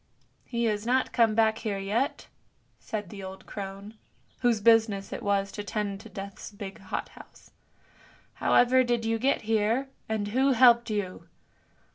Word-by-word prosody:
" - - -41
He 235 0 0
has 210 -2 0
not 255 +3 +1
come 225 -3 +3
back 220 -1 +3
here 210 -3 -2
yet," 215 +9 -1 0.5
said 210 -4 -5
the 200 - -8
old 190 0 -9
crone, 200 +2 -8 0.4
whose 240 -3 +2
business 220 -2 +3
it - - -5
was 200 -1 0
to 205 - -6
tend 205 -1 -4
Death's 200 -1 -8
big 200 -2 -8
hot 195 - -5
house. - - -16 0.4
" - - -28
However 255 +1 +5
did 240 -2 0
you 225 0 0
get 265 +1 +1
here, 225 +5 +1 0.2
and 210 -2 -1
who 265 +5 +3
helped 240 -1 +6
you? 205 -4 -4
220 Hz, 160 wpm, -28 LUFS, 200-235 Hz, 0.5 s, helped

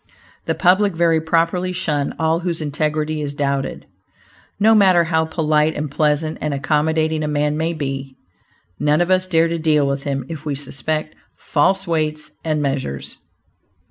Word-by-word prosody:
The - - 0
public 190 +1 +3
very 165 -1 +3
properly 170 +3 +1
shun 150 -6 -2
all 160 +1 +1
whose 170 -2 -2
integrity 150 +1 -1
is 145 -1 -4
doubted. 140 -1 -2 0.7
No 220 +2 +5
matter 190 -5 +5
how 160 -1 +1
polite 155 -1 +1
and 150 -1 -3
pleasant 155 +1 0
and 150 -2 -1
accommodating 155 +2 0
a - - -1
man 150 0 0
may 160 +2 -1
be, 135 -3 -5 0.6
none 150 +1 +2
of 175 +1 +1
us 185 0 +3
dare 165 -2 +3
to 165 0 -2
deal 155 -2 +2
with 140 0 -1
him 135 -2 -3
if 155 -1 -7
we 150 -3 -2
suspect 155 +3 -3 0.2
"false 190 +6 +1
weights 155 -3 -2
and 155 -2 0
measures." 135 - -3
155 Hz, 160 wpm, -20 LUFS, 145-165 Hz, 0.7 s, No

